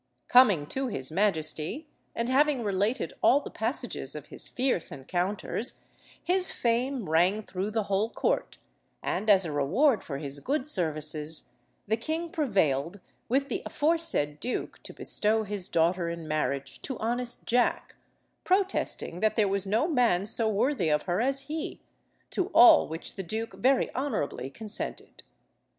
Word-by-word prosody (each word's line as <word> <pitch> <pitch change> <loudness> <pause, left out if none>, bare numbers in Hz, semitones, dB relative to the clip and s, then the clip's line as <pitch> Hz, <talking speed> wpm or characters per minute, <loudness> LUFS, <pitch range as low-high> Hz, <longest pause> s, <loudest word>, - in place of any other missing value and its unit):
Coming 210 - +6
to 270 0 -2
his 135 - -3
majesty, 165 - 0 0.3
and 235 - -1
having 275 0 +3
related 205 +5 0
all 275 - +5
the 290 - -9
passages - - -3
of - - -8
his - - -7
fierce 255 -9 0
encounters, 185 - -2 0.4
his 365 +1 +3
fame 245 0 -1
rang 180 +7 +2
through 195 +1 -3
the 220 0 -1
whole 200 +3 0
court, - - -1 0.5
and, 215 - -1
as 195 -3 +6
a 160 - -3
reward 195 - +2
for 140 - -5
his 140 0 -5
good 275 - -1
services, 155 - -2 0.4
the 220 +2 +1
king 320 +7 -3
prevailed 190 - 0 0.3
with 275 +3 +1
the 255 - -3
aforesaid 305 - 0
duke 250 - -4
to - - -8
bestow 220 +1 0
his 205 -3 -3
daughter 170 +1 +1
in 170 -1 -6
marriage 140 -3 -2
to 265 - -4
honest 240 +2 -3
Jack, 245 +1 +1 0.5
protesting 375 - 0
that 215 +2 +1
there 215 -3 +3
was 195 0 -1
no 220 +10 +2
man 240 - +2
so 220 +1 +3
worthy 215 - +1
of 150 0 +2
her 180 +4 0
as 270 +2 0
he, 300 +3 -5 0.5
to 370 - 0
all 240 - +8
which 165 +5 -7
the - - -2
duke 220 +5 -4
very 265 +1 +2
honourably 225 - -2
consented. 215 +8 -5
215 Hz, 150 wpm, -28 LUFS, 170-260 Hz, 0.5 s, all